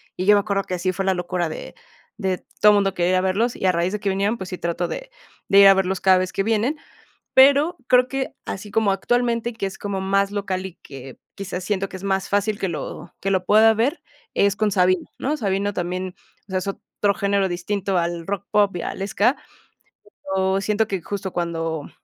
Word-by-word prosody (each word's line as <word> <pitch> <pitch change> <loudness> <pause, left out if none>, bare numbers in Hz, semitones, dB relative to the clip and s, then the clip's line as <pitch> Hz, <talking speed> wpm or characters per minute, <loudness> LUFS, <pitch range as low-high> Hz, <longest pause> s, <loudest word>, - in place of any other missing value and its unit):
y 185 - -3
yo 210 +1 +7
me 205 - +4
acuerdo 200 -1 -1
que 185 - -6
así 185 +1 -1
fue 195 +1 -3
la 190 - +3
locura 180 -1 -2
de 155 - -8 0.5
de 190 -3 -2 0.2
todo 210 0 +7
mundo 195 -1 +2
quería 175 +1 +1
ir - - +3
a - - +2
verlos, 200 +6 0
y - - -4
a - - +5
raíz 175 +2 0
de 210 - -2
que 200 - -1
vinieron, 200 +4 0
pues 190 -1 -7
sí 180 - -5
trato 170 0 -2
de - - -6 0.4
de 200 - +6
ir 200 - +9
a 195 - +9
verlos 190 -1 -1
cada 190 -1 +5
vez 185 0 -2
que 195 - 0
vienen. 225 +7 0 0.6
Pero 285 +6 +5
creo 250 0 +5
que 270 0 -3
así 200 +2 -6
como 220 -2 +2
actualmente 235 +4 0
que 225 -3 -4
es 195 - -5
como 200 -2 -3
más 195 +1 +1
local, 190 -2 -3
y 185 -3 -8
que 135 -2 -11 0.2
quizás 190 -2 -5
siento 195 0 -1
que 195 - -9
es 185 - -13
más 195 -1 0
fácil 205 +1 0
que 195 - -1
lo 150 -5 -6
que 195 - -1
lo 185 -1 0
pueda 220 +3 +6
ver, 245 +9 0 0.3
es 200 0 +2
con 215 -1 +1
Sabino, 185 -1 +2
¿no? 290 +4 -1
Sabino 200 -2 -1
también, 180 0 -3 0.3
o - - -14
sea, 185 - +1
es 185 - -6
otro 200 +1 -1
género 200 -1 +1
distinto 190 +2 -2
al 170 -1 -2
rock 200 0 -3
pop 205 -2 +3
y 170 - -4
al 195 - -4
ska. 215 +6 +2 1.0
Pero 190 0 +1
siento 210 +2 +1
que 195 -3 -2
justo 200 0 -5
cuando, 165 -3 -3
195 Hz, 225 wpm, -22 LUFS, 185-210 Hz, 1.0 s, ir